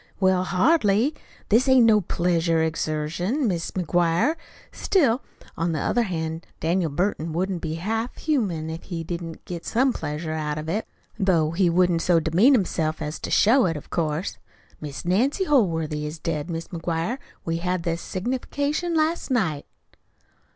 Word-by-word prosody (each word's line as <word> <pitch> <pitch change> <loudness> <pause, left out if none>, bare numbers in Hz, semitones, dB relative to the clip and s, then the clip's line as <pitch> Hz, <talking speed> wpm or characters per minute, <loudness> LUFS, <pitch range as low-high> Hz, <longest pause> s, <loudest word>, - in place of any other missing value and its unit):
"Well, 185 -1 +3
hardly. 225 - +3 0.4
This 235 +6 +4
ain't 260 -3 +6
no 215 -2 +5
pleasure 170 -2 +1
exertion, 160 - -1
Mis' 170 -4 -1
McGuire. 175 - +1 0.4
Still, 275 - +2 0.3
on 165 0 -1
the 155 - -1
other 240 - +1
hand, 165 -5 -3
Daniel 170 +1 +1
Burton 165 0 -1
wouldn't 180 +1 -1
be 160 -1 -3
half 225 +8 -3
humane 190 - -1
if 160 - -7
he 170 -3 -4
didn't 170 -1 -6
get 170 -2 -6
some 255 +2 +2
pleasure 155 +2 -4
out 150 -1 -2
of 155 +1 -5
it, 205 +7 -2 0.3
though 170 -6 +2
he 175 +1 +2
wouldn't 175 -1 +3
so 175 -1 +4
demean 180 - +4
himself 160 -7 0
as 155 -1 -4
to - - -5
show 235 +1 +5
it, 165 -2 -1
of 150 - -11
course. 160 +2 -2 0.4
Mis' 150 +1 -7
Nancy 245 - +2
Holworthy 165 - +1
is 150 +2 -6
dead, 155 0 -3
Mis' 165 -1 -4
McGuire. 170 +7 -2 0.3
We 165 0 -1
had 180 0 -1
the 165 -1 0
signification 285 - -2
last 320 +1 +1
night." 185 - 0
175 Hz, 160 wpm, -24 LUFS, 160-225 Hz, 0.4 s, ain't